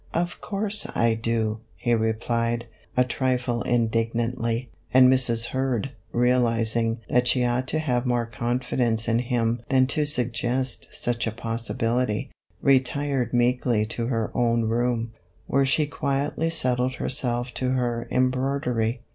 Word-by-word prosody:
" - - -27
Of 175 - -13
course 210 +1 -1
I 115 -1 +3
do," 110 -1 -1 0.2
he 120 - 0
replied, 115 +1 0 0.3
a 125 - +6
trifle 125 -1 -1
indignantly, 115 +1 0 0.2
and 130 0 +7
Mrs. 120 -3 +1
Kurd, 130 -1 -1 0.2
realizing 115 -2 +1
that 125 0 +2
she 125 0 +2
ought 125 +2 0
to 155 - -1
have 130 -5 0
more 120 -1 +1
confidence 120 -1 -1
in 115 0 +2
him 120 -2 0
than 130 -1 +4
to 150 - +1
suggest 125 -1 -1
such 120 -1 -1
a - - -1
pos 115 +1 -4
sibility, 115 +1 0 0.3
retired 135 -2 +2
meekly 120 -2 +2
to 115 +1 -3
her 115 -4 -1
own 115 -1 +2
room, 115 0 0 0.3
where 135 0 +2
she 150 +3 +2
quietly 145 +3 -1
settled 125 -4 +2
herself 120 -1 -2
to 130 - -1
her 120 -2 -1
embroidery. 130 -2 0
120 Hz, 140 wpm, -25 LUFS, 115-130 Hz, 0.3 s, and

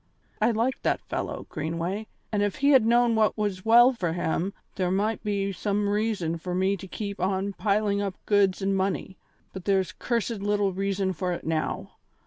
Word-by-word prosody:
I - - +4
liked 235 +3 0
that - - 0
fellow, - - -4
Greenway, 170 +7 -3 0.2
and 210 -2 +1
if 205 -1 0
he 280 +1 +3
had 260 -5 +6
known 240 0 +4
what 220 -1 +2
was 200 -3 -2
well 240 +3 +7
for 175 -9 -2
him 175 +2 -1 0.2
there 185 -2 -1
might 210 +4 0
be 200 -1 -1
some 205 +1 -1
reason 205 -6 0
for 180 +2 -4
me 190 +2 +2
to 190 - -9
keep 200 +1 -5
on 190 +2 0
piling 205 0 +1
up 195 -2 -2
goods 200 -2 +2
and 195 0 +1
money, 190 0 -2 0.3
but 190 -1 -8
there's 195 -2 +2
cursed 230 -3 -2
little 205 -1 +1
reason 195 0 -1
for 180 +1 -2
it 170 - -6
now. 160 -1 -2
200 Hz, 185 wpm, -26 LUFS, 185-215 Hz, 0.3 s, well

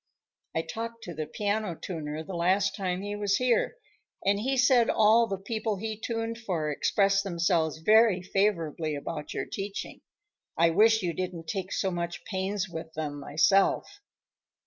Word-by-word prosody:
I 160 - +1
talked 230 +3 -6
to 175 - -6
the 155 -1 -4
piano 205 +1 -1
tuner 155 -3 -5
the 190 - -8
last 185 +3 +2
time 185 -2 -2
he 205 0 -3
was 205 -1 +1
here, 250 - +1 0.5
and 200 +1 +3
he 265 +5 0
said 250 -2 +5
all 220 +2 +5
the 195 - -2
people 215 +2 -2
he 220 +2 -4
tuned 230 0 -3
for 170 -9 -2
expressed 195 +6 +2
themselves 170 -4 +1
very 210 +2 +4
favorably 170 -6 0
about 150 +1 -5
your - - -2
teaching. 200 0 -6 0.6
I 165 0 +4
wish 220 +4 +4
you 175 -2 -1
didn't 180 -1 -4
take 190 +2 -3
so 190 - 0
much 175 0 -4
pains 195 0 -2
with 160 -2 -7
them, 150 -2 -4
myself." 195 - +2
195 Hz, 160 wpm, -28 LUFS, 165-215 Hz, 0.6 s, said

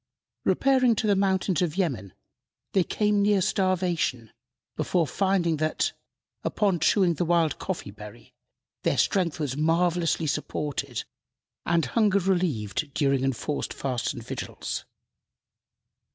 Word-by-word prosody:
Repairing 260 -3 +3
to 215 - -1
the 205 -1 +3
mountains 190 -3 +1
of 175 -1 -1
Yemen, 125 - -1 0.6
they 190 - +4
came 210 +2 +1
near 205 0 +3
starvation 185 - 0 0.4
before 175 -3 +1
finding 180 -2 +1
that, 155 +1 0 0.5
upon 195 -5 +1
chewing 180 +2 +3
the 170 - -1
wild 165 -3 +2
coffee 175 - -4
berry, 105 0 -12 0.5
their - - +1
strength 175 -5 +1
was 140 -4 -2
marvellously 165 +2 +1
supported 145 -4 -3 0.6
and 170 -3 +2
hunger 205 - +2
relieved 165 - 0
during 135 -3 +2
enforced 135 +3 -2
fasts 125 -4 -2
and 120 -4 -8
vigils. - - -5
170 Hz, 120 wpm, -26 LUFS, 140-190 Hz, 0.6 s, they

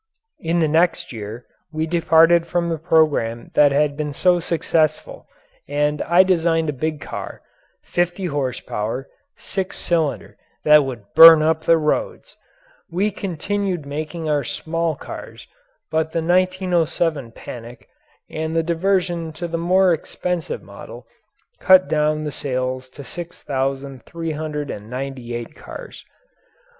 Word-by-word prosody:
In 170 +1 0
the 160 - +3
next 165 -2 +1
year 110 +2 -7 0.3
we 155 0 -1
departed 165 0 +4
from 170 0 -1
the 165 -2 -2
programme 150 -8 +1
that 145 -1 +5
had 145 0 +1
been 150 -1 -3
so 180 +4 +3
successful 160 -2 -1 0.4
and 150 +1 0
I 175 +2 +5
designed 165 -3 +1
a - - -1
big 155 +3 -3
car - - -7 0.4
fifty 175 +2 -1
horsepower, 130 -5 -3 0.3
six 190 -1 -4
cylinder 160 -5 -1 0.3
that 150 -1 +6
would 130 -5 -6
burn 160 0 +10
up 160 0 +1
the 165 - +5
roads. 160 - -2 0.5
We 190 +5 0
continued 190 -2 -3
making 155 +3 -5
our 145 -2 +1
small 165 0 -2
cars, - - -9 0.5
but 160 0 0
the 165 - -1
1907 175 -6 +1
panic 120 0 -10 0.4
and 160 +1 -4
the 165 - +2
diversion 170 -1 0
to 175 +2 -5
the 165 0 -3
more 180 +1 +4
expensive 170 +1 -4
model - - -11 0.5
cut 185 0 +6
down 155 0 +1
the 150 - -3
sales 130 -1 -3
to 140 +2 -11
6,398 135 -4 -5
cars. - - -10
160 Hz, 125 wpm, -21 LUFS, 140-170 Hz, 0.5 s, burn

